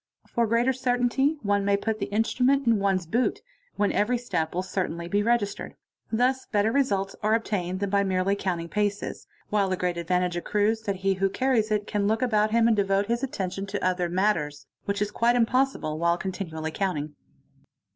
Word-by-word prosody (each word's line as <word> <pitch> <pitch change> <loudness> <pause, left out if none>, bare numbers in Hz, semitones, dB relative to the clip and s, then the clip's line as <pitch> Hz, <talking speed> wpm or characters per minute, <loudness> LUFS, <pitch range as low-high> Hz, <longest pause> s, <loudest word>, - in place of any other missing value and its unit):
For 235 -1 0
greater 235 +4 +2
certainty 255 +4 +1
on 200 0 +2
may 200 0 +2
put 220 +1 -2
the 200 - -2
instrument 250 +6 +1
in 230 -3 +3
one's 195 -2 +1
boot, 250 - 0 0.3
when 205 - +1
every 245 +4 +1
step 165 -10 -2
will 180 - 0
certainly 180 -2 -3
b 205 +3 +1
registered. 220 -2 -1 0.4
Thus 255 +3 +1
better 210 +1 +1
results 200 -8 0
are 215 +1 +3
obtained 185 -5 -2
than 200 -1 -1
by 200 0 +3
merely 190 +1 +1
countin 175 -4 -2
paces, 205 +2 -2 0.2
while 205 -2 +2
the 185 - -1
great 180 -1 -1
advantage 180 +1 0
accrues 210 +5 0
that 200 - 0
he 195 - +4
who 195 +1 0
carries 235 0 +1
it 210 -1 0
can 205 -1 -1
loo 220 +1 +2
about 215 -4 +2
him 230 +1 +3
and 230 - +4
devote 195 0 +1
his 235 +3 -1
attention 195 -7 -3
to 200 0 -3
other 180 -1 +1
matters, 170 -7 0 0.2
which 200 0 0
is 205 - -4
quit 235 +3 +2
impossible 245 - +1
while 170 0 +2
continually 170 -4 -4
counting. 155 -6 -2
205 Hz, 185 wpm, -26 LUFS, 185-230 Hz, 0.4 s, he